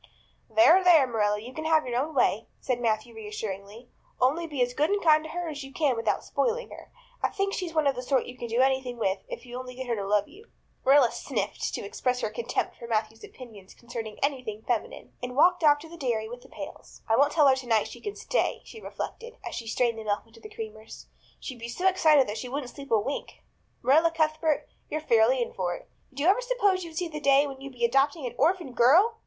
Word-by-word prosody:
"There, 350 +3 +6
there, 335 -6 +7
Marilla, 210 -4 0
you 240 +4 -10
can 315 +3 -6
have 315 -1 +3
your 245 -1 -1
own 300 +3 -3
way," 225 -4 +2
said 250 -2 -1
Matthew 225 0 0
reassuringly. 210 +1 -7 0.3
"Only 300 +7 +2
be 285 -5 0
as 245 0 -2
good 295 +4 +1
and 410 0 +1
kind 310 -4 +4
to 315 - -8
her 350 +1 -4
as 290 -3 -5
you 270 - -10
can 285 -3 +1
without 230 0 -1
spoiling - - -1
her. - - -12 0.3
I - - -36
kind - - -12
of - - -21
think 395 0 0
she's 345 -3 -4
one 310 -1 +2
of 280 - +3
the 250 - -5
sort 260 +1 +1
you 250 - -9
can 240 - -6
do 235 +2 +1
anything 260 -2 +1
with 195 -3 0
if - - -7
you 245 0 -9
only 250 -1 -8
get 260 +1 -5
her 240 -2 -1
to 200 -2 -4
love 205 0 +2
you." 425 +4 -16 0.4
Marilla 270 -3 +5
sniffed, - - -3
to - - -5
express 250 -1 -1
her - - -2
contempt 475 - -2
for 235 - -9
Matthew's 220 0 -2
opinions 215 -7 -12
concerning 230 -3 -7
anything 250 -7 -2
feminine, 240 -3 -3
and 250 0 -5
walked 355 +4 +4
off 295 -1 +6
to 325 - -10
the 340 +1 -11
dairy 235 -7 -1
with 245 +2 -9
the - - -17
pails. - - -10
"I 225 - +3
won't 285 +4 +4
tell 300 -3 +5
her 265 - +6
tonight 240 -4 +1
that - - -6
she - - -11
can 415 -1 -5
stay," - - -1
she 445 - -11
reflected, 470 +3 -7
as - - -5
she 230 - -5
strained 230 0 0
the - - -6
milk 205 -1 -1
into 230 0 -18
the 215 - -11
creamers. 220 0 -9 0.3
"She'd 255 -4 -7
be 230 +1 -6
so 360 +10 0
excited 315 -7 +5
that 210 +1 -4
she 250 - -6
wouldn't 270 -1 -4
sleep 280 -1 -11
a 225 - +4
wink. 270 +7 -5 0.4
Marilla 305 +7 +5
Cuthbert, 315 -1 0 0.2
you're 310 - -2
fairly 240 -3 +3
in - - -8
for 175 -2 -2
it. - - -12 0.2
Did 275 +1 -7
you - - +1
ever 390 +7 +4
suppose 415 -7 +1
you'd 325 -2 -9
see 355 - -1
the 305 -2 -6
day 280 0 +4
when 270 -2 -8
you'd 275 0 -8
be 240 -1 0
adopting 275 +4 +2
an 240 - -4
orphan 330 -2 +1
girl? 360 - +5
260 Hz, 245 wpm, -27 LUFS, 230-315 Hz, 0.4 s, there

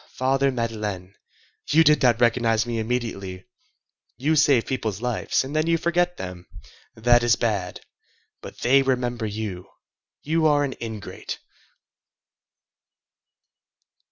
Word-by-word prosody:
Father 135 +1 +2
Madeleine! 105 -6 -4 0.6
You 160 +2 +5
did 150 -1 +4
not 120 -4 +3
recognize 115 -2 +2
me 120 -1 -3
immediately; 110 -5 -4 0.7
you 150 +6 +1
save 140 -6 +4
people's 110 -7 -3
lives, 125 +1 -1
and 135 +3 -7
then 155 +1 +1
you 165 0 +3
forget 175 +2 0
them! 90 -1 -8 0.5
That 120 +2 +4
is 120 -1 +3
bad! 100 -6 -2 0.6
But - - -11
they 135 +3 +5
remember 125 -3 -1
you! 105 -4 -5 0.5
You 160 +1 +2
are 145 -1 +3
an 135 -2 -2
ingrate!" 110 -3 -6
120 Hz, 120 wpm, -24 LUFS, 110-140 Hz, 0.7 s, You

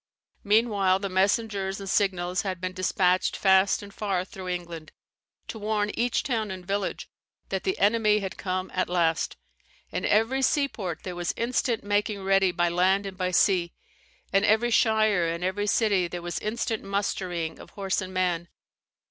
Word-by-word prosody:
Meanwhile 205 -3 +3
the 200 0 -4
messengers 195 0 0
and 195 - -7
signals 185 -2 +1
had 190 -3 -4
been 185 0 -4
despatched 185 0 +1
fast 190 +1 +3
and 200 -1 -11
far 195 -4 -1
through 185 -1 -9
England, 170 -3 -5 0.6
to 220 - -6
warn 210 0 0
each 240 0 0
town 230 -7 -1
and 185 -1 -7
village 200 +1 -2 0.4
that - - -3
the 380 +2 0
enemy 210 0 +3
had 195 -2 -4
come 185 0 -3
at 185 - 0
last. 170 -2 0 0.5
In 180 - -3
every 225 +7 +2
seaport 255 - -1
there 180 - -5
was 175 -1 -2
instant 235 -1 0
making 205 0 -1
ready 195 -1 +3
by 175 0 +1
land 185 +3 +2
and 195 -1 -6
by 185 -1 -1
sea; 180 -1 +2 0.6
in 195 +1 +4
every 220 +3 +3
shire 215 -6 +3
and 170 +1 -3
every 195 +3 -1
city 200 -4 +2
there 175 0 -6
was 175 0 -3
instant 220 0 -2
mustering 185 -4 -2
of - - -12
horse 195 -1 -2
and 185 0 -6
man. 180 -2 0
195 Hz, 165 wpm, -26 LUFS, 180-210 Hz, 0.6 s, in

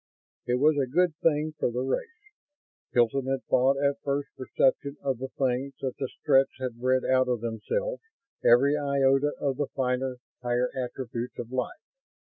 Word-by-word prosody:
It 125 - +2
was 145 +3 +3
a 130 -2 0
good 175 +3 +2
thing 155 -2 +1
for - - +1
the 125 +2 -2
race, 440 - -4 0.6
Hilton 125 +3 +2
had 135 0 -1
thought 130 +2 +3
at 140 0 0
first 140 0 -1
perception 135 +2 0
of 135 -3 -1
the 130 - -3
things, 135 +1 0
that 130 -2 -2
the 135 - -2
Stretts 135 -1 +3
had 125 -3 -4
bred 130 0 +2
out 130 0 +3
of 120 -3 0
themselves - - -2 0.4
every 135 +5 +5
iota 140 0 +2
of 135 -2 -1
the 145 -1 -1
finer, 130 0 -1 0.2
higher 125 0 0
attributes 125 -1 -4
of 120 0 -6
life. 130 - -3
135 Hz, 165 wpm, -27 LUFS, 125-140 Hz, 0.6 s, every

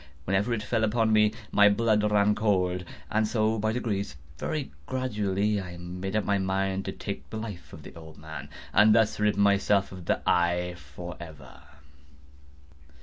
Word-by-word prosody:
Whenever 95 +4 +1
it 110 -2 -1
fell 115 -1 0
upon 110 0 +2
me, 105 0 +5 0.2
my 105 0 +6
blood 105 0 +2
ran 105 0 +4
cold; 90 -4 +1 0.3
and 110 0 +2
so 110 0 +1
by 110 +1 +1
degrees—very 100 - -4 0.2
gradually—I 105 -6 -1
made 90 +3 -5
up 110 - +1
my 100 -1 +1
mind 95 0 -1
to - - -2
take 70 +1 -6
the - - -5
life 105 -5 -7
of - - -11
the - - -11
old 80 -1 -12
man, 80 +1 -8 0.2
and 105 +2 +6
thus 110 -2 +2
rid 105 -1 +2
myself 100 0 +3
of 90 -2 -9
the - - -1
eye 90 0 +2
forever. 75 -3 -10
100 Hz, 155 wpm, -27 LUFS, 90-110 Hz, 0.3 s, my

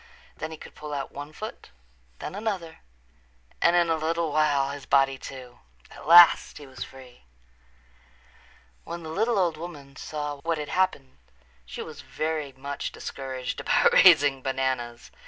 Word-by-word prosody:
Then - - -5
he 160 - -8
could - - -12
pull 150 -1 -7
out 135 -1 -4
one 145 +1 -8
foot, 215 - -8 0.5
then - - -7
another, 195 -6 -4 0.8
and 170 - +4
in 175 -1 +4
a 165 - +2
little 160 0 -1
while 145 -2 +2
his 140 -1 -9
body, 135 -1 +3
too. 125 -2 -10 0.3
At - - -12
last 170 +1 +7
he 145 - -10
was 130 -2 -7
free. 125 - -14 1.6
When 170 0 -7
the 160 - -7
little 220 +6 +1
old 175 -5 +1
woman 150 -5 -9
saw 150 0 -5
what 165 +2 -1
had 150 -1 -5
happened 180 - -1 0.5
she - - -6
was - - -10
very 155 -2 -3
much 140 +2 -5
discouraged 130 -2 -6
about - - +3
raising 140 -2 +6
bananas. 130 -3 -3
145 Hz, 155 wpm, -26 LUFS, 135-165 Hz, 1.6 s, last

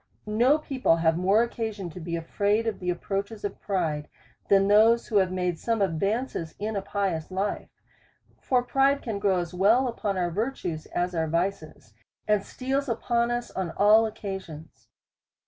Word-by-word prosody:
No 235 +7 +3
people 270 - +1
have 165 -1 +2
more 195 +6 +3
occasion 220 -6 -4
to 180 - -9
be 170 0 -4
afraid 205 +6 0
of 225 -2 -2
the 180 - -3
approaches 200 +4 -3
of 205 - -5
pride, 160 -7 -2 0.4
than 195 0 +5
those 220 +3 +5
who 215 - 0
have 190 -2 +3
made 180 -2 -1
some 230 -1 -1
advances 195 -1 -1
in 215 +1 -3
a 200 - -1
pious 195 -5 -2
life. 195 +2 -3 0.7
For 250 -2 +1
pride 275 +2 +2
can 220 -4 -3
grow 200 -2 +2
as 175 0 -3
well 220 +8 +3
upon 205 -5 -2
our 175 -1 0
virtues 180 -6 -3
as 175 +1 -2
our 160 -1 0
vices, 165 - -3 0.3
and 210 -2 +2
steals 265 +5 -2
upon 235 +1 0
us 240 0 -3
on 185 -3 -3
all 215 +2 +6
occasions. 170 - -8
200 Hz, 165 wpm, -26 LUFS, 175-225 Hz, 0.7 s, all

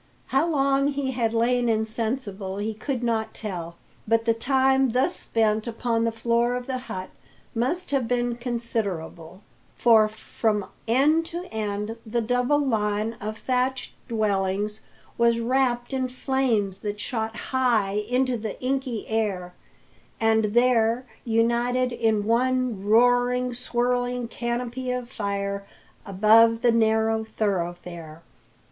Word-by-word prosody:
How 275 +5 +3
long 275 -2 +2
he 280 -2 -1
had 235 -3 0
lain 240 +1 +2
insensible 220 -3 -2
he 215 +2 -2
could 245 +3 -4
not 225 -2 -1
tell; 175 -6 -5 0.3
but 230 +1 +2
the 230 - +4
time 265 +1 +2
thus 255 +2 +2
spent 220 0 0
upon 230 0 0
the 230 - +1
floor 235 +2 +1
of 250 0 -4
the 260 -1 -3
hut 185 0 -5 0.4
must 270 +9 -1
have 270 -4 +1
been 245 0 0
considerable, 200 -8 -4 0.3
for 225 -3 +5
from 215 -1 -2 0.2
end 300 +8 +3
to 345 +2 -5
end 210 +1 -3
the 235 +1 -2
double 245 +5 +1
line 215 -4 0
of 215 +1 -4
thatched 255 +2 -1
dwellings 210 -2 -1 0.4
was 235 0 +4
wrapped 245 +1 0
in 260 -1 0
flames 250 -6 0
that 205 0 -4
shot 225 -1 -3
high 225 -5 +1
into 255 0 +1
the 215 -2 -5
inky 255 -3 -2
air, 200 -5 -1 0.7
and 220 -1 +3
there 235 +2 +2 0.2
united 240 +2 +1
in 225 -3 +1
one 250 -2 +1
roaring, 245 +3 +3
swirling 245 0 -1
canopy 240 +2 -3
of 250 0 -3
fire 200 -3 -3 0.4
above 225 +4 +5
the 240 - +5
narrow 220 -1 +2
thoroughfare. 175 -6 -4
230 Hz, 125 wpm, -25 LUFS, 215-250 Hz, 0.7 s, for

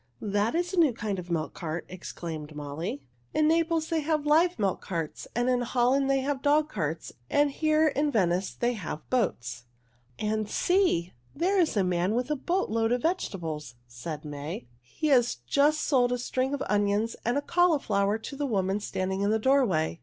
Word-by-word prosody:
"That 205 +5 0
is 350 +2 -1
a 365 - +2
new 305 -7 +5
kind 210 -4 -3
of 180 0 -8
milk 160 -2 -2
cart," 165 -1 -4
exclaimed 160 -4 -7
Molly. 145 +1 -5 0.3
"In 305 0 +4
Naples 325 0 +2
they 330 -2 +1
have 305 -1 0
live 330 +4 +4
milk 200 -4 0
carts, 165 -4 -4
and 240 +1 +1
in 250 -1 +2
Holland 255 +3 +2
they 270 0 +3
have 275 0 -2
dog 300 +1 +3
carts, 160 - -3 0.2
and 290 0 +3
here 310 +2 +2
in 290 +1 0
Venice 185 -5 +1
they 240 +1 0
have 165 -8 -6
boats." 120 - -1 0.5
"And 215 0 -1
see! 355 - +2 0.2
There 370 +6 +2
is 330 -10 +2
a 200 - +4
man 180 +3 +1
with 250 +4 -1
a - - +2
boat 345 - -1
load 225 0 +1
of 245 0 0
vegetables," 165 - -2
said 150 +6 -7
May. 145 -1 -6 0.2
"He 125 - -6
has 245 -4 +4
just 295 - +3
sold 250 -4 +2
a 250 - +1
string 255 +3 -1
of 280 - -3
onions 205 +2 +1
and 240 +4 +1
a - - +1
cauliflower 245 - +2
to 225 +5 -8
the 285 0 -2
woman 195 -3 0
standing 190 -1 -2
in 200 - +2
the 220 - +3
doorway. 215 - +2
230 Hz, 190 wpm, -28 LUFS, 180-290 Hz, 0.5 s, new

